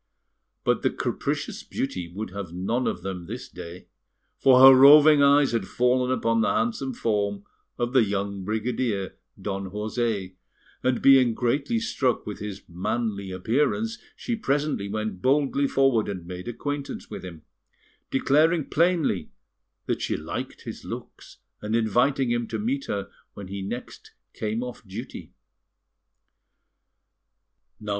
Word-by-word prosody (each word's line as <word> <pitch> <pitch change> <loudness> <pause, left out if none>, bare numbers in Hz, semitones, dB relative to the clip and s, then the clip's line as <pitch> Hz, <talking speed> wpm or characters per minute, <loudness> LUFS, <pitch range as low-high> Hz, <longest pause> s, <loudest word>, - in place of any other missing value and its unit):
But - - +1
the - - +2
capricious - - -3
beauty 95 -11 -4
would 100 +1 -6
have 100 -3 -6
none 100 +8 -1
of - - -3
them 90 -3 -5
this 120 +5 -6
day, 90 0 -10 0.5
for 130 -2 +6
her 135 0 +11
roving 145 +3 +8
eye 140 +1 +6
had 115 -7 -1
fallen 125 +1 +1
upon 115 -3 +1
the - - +2
handsome 175 - -1
form 100 -3 -1 0.3
of 120 +1 -2
the 130 -3 +6
young 100 -1 -2
brigadier, 110 -1 -2 0.2
Don 95 -1 -4
José, 105 -2 -2 0.4
and 130 -1 0
being 130 -4 +6
greatly 140 - 0
struck 140 - 0
with 105 - -6
his 105 -1 -6
manly 100 +3 -3
appearance, 145 - 0 0.2
she 240 - -3
presently 145 - -1
went 105 -3 -3
boldly 140 +2 +2
forward 135 -6 +2
and 95 -4 -5
made 90 +2 -7
acquaintance 145 +4 -5
with - - -7
him, 85 -4 -9 0.7
declaring 155 +4 +2
plainly 170 -1 +1 0.6
that - - -2
she - - -1
liked - - -6
his - - -8
looks, - - -9 0.2
and 105 +1 -2
inviting 120 +4 +2
him 120 -1 0
to 110 - -3
meet 130 +6 -2
her 100 -1 -4 0.2
when 100 -2 -8 0.2
next 120 - -8 0.2
he - - -22
came 110 +2 -1
off 125 -1 -8
duty. 95 -2 -8
115 Hz, 135 wpm, -25 LUFS, 100-135 Hz, 0.7 s, her